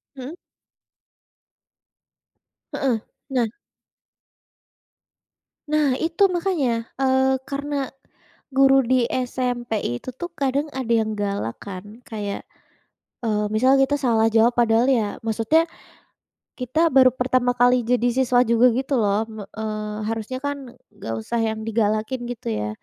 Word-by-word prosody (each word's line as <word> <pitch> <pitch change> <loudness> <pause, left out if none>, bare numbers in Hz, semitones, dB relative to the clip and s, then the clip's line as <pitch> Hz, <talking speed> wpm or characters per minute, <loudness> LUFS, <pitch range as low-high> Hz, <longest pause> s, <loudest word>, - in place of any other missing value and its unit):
Mhm. 270 +5 -7 2.4
Heeh, 245 -5 0 0.3
nah 245 -4 +1 2.2
nah, 295 -4 +2
itu 330 +5 +1
makanya. 290 -11 0
Eee, 265 0 +3
karena 280 -1 -3 0.6
guru 270 0 +6
di 255 0 +3 0.2
SMP 245 -2 -3 0.3
itu - - -8
tuh 345 +5 -5
kadang 285 -1 0
ada 260 -3 -4
yang 220 - -2
galak 200 - -2
kan, 205 +4 -9
kayak, 205 -3 -4 0.8
eee, 210 -1 +1
misal 255 +5 +4
kita 285 +2 +2
salah 225 -4 +3
jawab 230 +2 +4
padahal 235 +1 +3
ya 225 -6 +1
maksudnya, 225 +9 +2 0.9
kita 280 +7 +1
baru 260 -1 +7
pertama 250 -1 +1
kali 245 0 +4
jadi 245 0 +1
siswa 250 -1 +3
juga 235 +1 +4
gitu 270 +1 -1
loh, 205 +1 +2
me 220 -1 -8
eee, 215 -1 -4
harusnya 225 +3 -4
kan 285 0 -1 0.4
enggak 115 - -5
usah 235 - -2
yang 220 -1 -1
digalakin, 215 +2 0
gitu 240 - -6
ya. 105 -1 -2
245 Hz, 120 wpm, -23 LUFS, 220-265 Hz, 2.4 s, baru